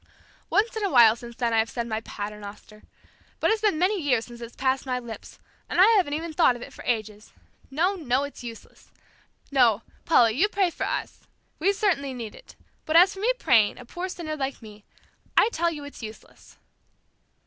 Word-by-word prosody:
Once 450 +3 +1
in 440 - -3
a 400 - +1
while 235 -7 +7
since 235 0 -11
then, 235 -1 -1
I 225 - +3
have 220 - +1
said 235 -2 -3
my 220 -1 -3
'paternoster.' 210 0 -8 0.6
But - - +2
it's 440 -1 0
been 420 -7 +2
many 370 +3 +1
years 250 -6 +1
since 240 -1 -12
it's 235 0 -9
passed 265 0 0
my 250 -1 0
lips, 235 -2 -9 0.3
and - - -1
I 375 - +9
haven't 345 -8 +2
even 325 +1 -5
thought 300 -6 +4
of 240 - -8
it - - -11
for - - -11
ages. 215 -3 -3 0.4
No, 335 +8 +1
no; 275 -7 0
it's 285 -3 -8
useless. 230 -1 -11 0.6
No, 235 -5 +3 0.2
Paula, 240 -8 +5
you 340 - +2
pray 385 -4 +1
for - - -3
us. - - -5 0.3
We 375 +6 +3
certainly 335 -10 0
need 230 -3 -6
it, - - -15 0.3
but 310 - 0
as 365 +4 +7
for 385 - -10
me 455 +5 +2
praying 225 - +3
a 250 - -11
poor 355 +9 -5
sinner 330 -4 -5
like 275 -2 -3
me 210 -1 -13 0.5
I - - +6
tell 340 +1 +1
you 300 -3 -7
it's 285 -2 -10
useless." 220 -1 -12
265 Hz, 205 wpm, -25 LUFS, 230-345 Hz, 0.6 s, I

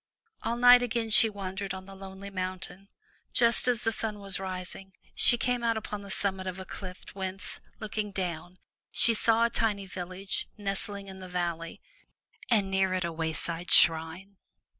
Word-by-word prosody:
All 235 +1 -2
night 245 0 +8
again 235 -2 -2
she 225 0 +7
wandered 195 -1 -5
on 190 0 -9
the 195 - -11
lonely 195 +1 -9
mountain. 185 +1 -5 0.5
Just 235 +1 +4
as 245 -1 +2
the 225 - +2
sun 215 -1 -3
was 195 -2 -2
rising, 190 0 -5 0.2
she 240 - +5
came 245 0 -1
out 230 -1 +1
upon 210 -1 -5
the 200 - -11
summit 190 -1 0
of 185 0 -4
a 190 - -7
cliff 185 -1 -9
whence, 190 0 -2 0.2
looking 215 -1 -4
down, 180 -1 -4 0.3
she 230 - +3
saw 230 +1 +4
a 235 - 0
tiny 210 -3 0
village 185 +1 -5
nestling 200 0 0
in 190 -1 -10
the 185 -1 -9
valley, 170 -2 -3 0.7
and 205 -5 +2
near 190 -1 +2
it 185 -1 -1
a 170 - -3
wayside 165 +2 -3
shrine. 165 +5 +3
195 Hz, 170 wpm, -29 LUFS, 185-215 Hz, 0.7 s, night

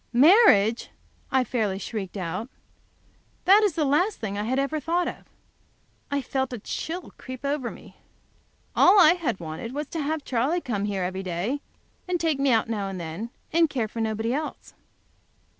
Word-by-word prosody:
"Marriage!" 245 - +5 0.4
I 260 -1 +3
fairly 215 -6 -1
shrieked 200 -1 -5
out. 185 +6 -4 1.0
That 395 +3 +7
is 410 -5 +2
the 305 -1 0
last 350 +10 +2
thing 200 -3 -4
I 205 +1 -2
have 255 +4 0
ever 275 +3 0
thought 340 +4 0
of. - - -7 0.8
I 285 -1 -1
felt 265 -1 -2
a 245 - -4
chill 330 - -5
creep 260 +1 -8
over 280 -4 -1
me. - - -13 0.8
All 395 +3 +7
I 330 -2 +8
had 340 - -2
wanted 170 - -6
was 295 +1 -2
to 325 - -3
have 300 0 -2
Charley 265 +8 +1
come 210 - -2
here 200 -2 -2
every 190 +1 -3
day, 190 +10 -2 0.6
take 320 -4 0
me 275 0 +2
out 225 0 +3
now 210 -3 -2
and 190 -1 -5
then, 170 +7 -5 0.2
and 330 -1 +4
care 245 -6 -1
for 230 - -7
nobody 220 +1 -1
else. 300 +2 -5
255 Hz, 175 wpm, -25 LUFS, 205-310 Hz, 1.0 s, I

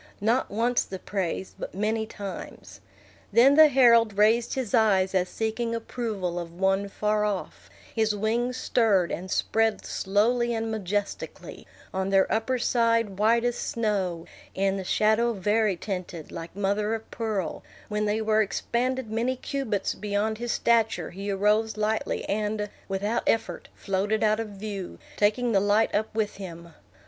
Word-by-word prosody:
Not 230 +5 +1
once 235 +4 +1
the 190 - -7
praise, 190 -1 -3
but - - -6
many 220 +2 -1
times. 200 -3 -8 0.5
Then 260 +4 +6
the 310 +1 +8
herald 235 -6 +5
raised 225 +3 +3
his 255 -6 -3
eyes 195 -5 +3
as 185 -1 +1
seeking 230 +1 -2
approval 215 -7 -3
of 170 -1 -6
one 195 +1 +1
far 210 +1 0
off; 205 -3 -4 0.2
his 220 -2 +1
wings 235 +4 0
stirred, 205 -9 +2
and 185 +2 -5
spread 225 +3 +1
slowly 235 +4 +1
and 225 0 -2
majestically, 205 -1 -4 0.3
on 190 0 -1
their 195 -1 +4
upper 225 +4 0
side 230 -4 +1
white 230 +2 +3
as 245 0 0
snow, 195 -7 -1 0.3
in 195 0 +1
the 190 - -4
shadow 220 +5 +2
vari 210 +1 +1
tinted, 180 -5 -6
like 165 +1 -8
mother 205 +2 0
of 225 - -9
pearl; 215 -5 -3 0.3
when 210 0 -1
they 210 +1 0
were 220 0 +3
expanded 235 +4 -1
many 235 +4 0
cubits 255 -6 -2
beyond 210 +1 -2
his 240 -1 -2
stature, 225 -7 +1
he 195 +3 -6
arose 210 +2 +1
lightly, 215 +1 -1
and, 210 0 -2 0.2
without 205 +4 -1
effort, 225 - 0
floated 205 +3 -1
out 215 0 +3
of 225 - -3
view, 200 -2 -6 0.2
taking 225 +4 +2
the 200 - +4
light 205 +3 +2
up 215 +1 +1
with 215 -3 -1
him. 170 -3 -9
215 Hz, 155 wpm, -26 LUFS, 195-230 Hz, 0.5 s, the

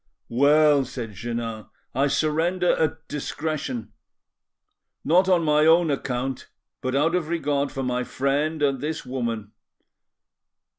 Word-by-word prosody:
"Well," 145 +3 +4
said 125 -4 -6
Jeannin, 115 +1 -5 0.3
"I 135 +3 +2
surrender 165 +5 +1
at 160 0 -1
discretion—not 150 - -4
on 175 -2 +4
my 150 0 +3
own 165 -1 +5
account, 130 -1 -3 0.3
but 130 0 -2
out 155 +4 +2
of 180 -3 0
regard 145 -4 -1
for 135 - -4
my 125 0 -1
friend 145 +4 -1
and 135 -3 +1
this 155 +1 -3
woman. 115 -5 -3
140 Hz, 115 wpm, -24 LUFS, 125-155 Hz, 0.3 s, own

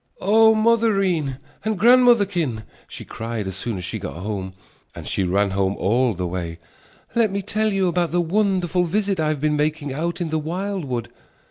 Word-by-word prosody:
"Oh, 220 +3 +5
mothereen 195 - +2 0.3
and 215 -1 -1
grandmotherkin," 200 - +4 0.2
she - - -9
cried 115 -2 -5
as 95 -1 -4
soon 110 +2 -3
as 90 - -5
she - - -4
got - - -6
home, 95 +1 -5 0.4
and - - -8
she - - -1
ran 100 +2 +1
home 95 0 0
all 115 +3 +1
the 90 +1 -3
way 85 -2 -4 0.6
"let 230 -2 +3
me 200 0 -3
tell 215 +2 0
you 195 -2 +1
about 175 -1 0
the 175 - 0
wonderful 180 0 +1
visit 195 +2 -1
I 155 - +1
have 155 -2 -1
been 150 +1 +1
making 150 -1 -1
out 170 +5 -3
in 170 -2 -2
the 160 0 0
wildwood." 160 - -3
165 Hz, 185 wpm, -22 LUFS, -, 0.6 s, Oh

